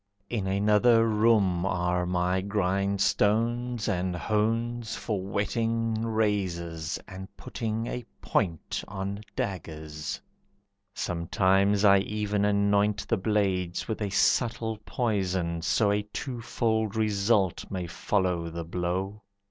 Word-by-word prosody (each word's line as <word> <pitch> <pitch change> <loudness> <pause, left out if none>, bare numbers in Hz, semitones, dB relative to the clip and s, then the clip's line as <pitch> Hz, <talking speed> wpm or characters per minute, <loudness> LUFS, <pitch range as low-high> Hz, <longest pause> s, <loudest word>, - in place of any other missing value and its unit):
In 105 -5 -1
another 105 +4 +4
room 105 -5 +3
are 90 -1 0
my 90 +1 +1
grindstones 105 +4 +1
and 90 -2 0
hones, 115 +5 -1
For 105 -5 -2
whetting 115 +3 -1
razors 95 -7 -1
and 95 0 -8
putting 115 0 -3
a 125 +1 -4 0.2
point 85 -7 -1
On 100 +1 -4
daggers, 80 -5 -4 0.8
sometimes 95 +4 +2
I 100 -1 +7
even 105 0 -1
anoint 100 0 +2
The 115 - +2
blades 95 -4 0
with 110 -1 -3
a 105 - 0
subtle 110 +1 +1
poison, 95 -7 -1
so 100 +4 +2
A 105 0 +1
twofold 110 -1 -2
result 105 -3 +1
may 90 -2 -3
follow 90 -1 -1
the 85 +1 -5
blow. 90 +4 -2
100 Hz, 110 wpm, -28 LUFS, 90-110 Hz, 0.8 s, I